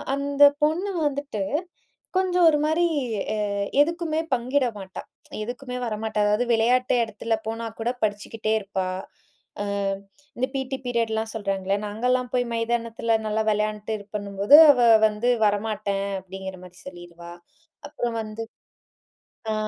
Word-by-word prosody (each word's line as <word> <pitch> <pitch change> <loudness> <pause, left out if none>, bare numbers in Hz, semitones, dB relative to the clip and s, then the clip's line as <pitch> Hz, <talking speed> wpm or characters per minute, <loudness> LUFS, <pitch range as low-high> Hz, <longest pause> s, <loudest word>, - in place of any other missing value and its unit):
"அந்த 280 0 +2 0.2
பொண்ணு 350 +7 +1 0.2
வந்துட்டு, 280 -8 -3 0.7
கொஞ்சம் 360 -2 +3
ஒரு 300 - +2
மாரி 320 +3 +2 0.5
அ - - -1 0.5
எதுக்குமே 330 0 0
பங்கிட 255 +2 +1
மாட்டா. 190 -1 -8 0.4
எதுக்குமே 250 +2 -6
வரமாட்டா 215 -1 -3
அதாவது, 210 +4 +2
விளையாட்டு 250 +3 +2
எடத்துல 225 +1 -2
போனா 225 +1 -3
கூட 235 +2 0
படிச்சுக்கிட்டே 215 +1 -1
இருப்பா." 190 -2 -3 0.8
அ - - -3 0.7
இந்த 255 - +1
பிடி 265 0 -2
பீரியட்லாம் 225 -2 -1
சொல்றாங்கள்ல 195 -1 -1
நாங்கலாம் 250 +4 0
போய் 245 0 +2
மைதானத்தில 230 -1 0
நல்லா 220 +1 0
விளையாண்ட்டு, 210 +1 -1
இதுப்பண்ணும்போது, 205 +4 +3
அவ 250 - 0 0.3
வந்து 215 +3 -1 0.2
"வரமாட்டேன்" 205 -1 -1
அப்டிங்கிற 190 0 -8
மாரி 180 0 -15
சொல்லிருவா. 175 -1 -10 0.6
அப்புறம் 240 -5 -3
வந்து 215 +1 -6 1.1
ஆ, - - 0
225 Hz, 120 wpm, -24 LUFS, 205-255 Hz, 1.1 s, கொஞ்சம்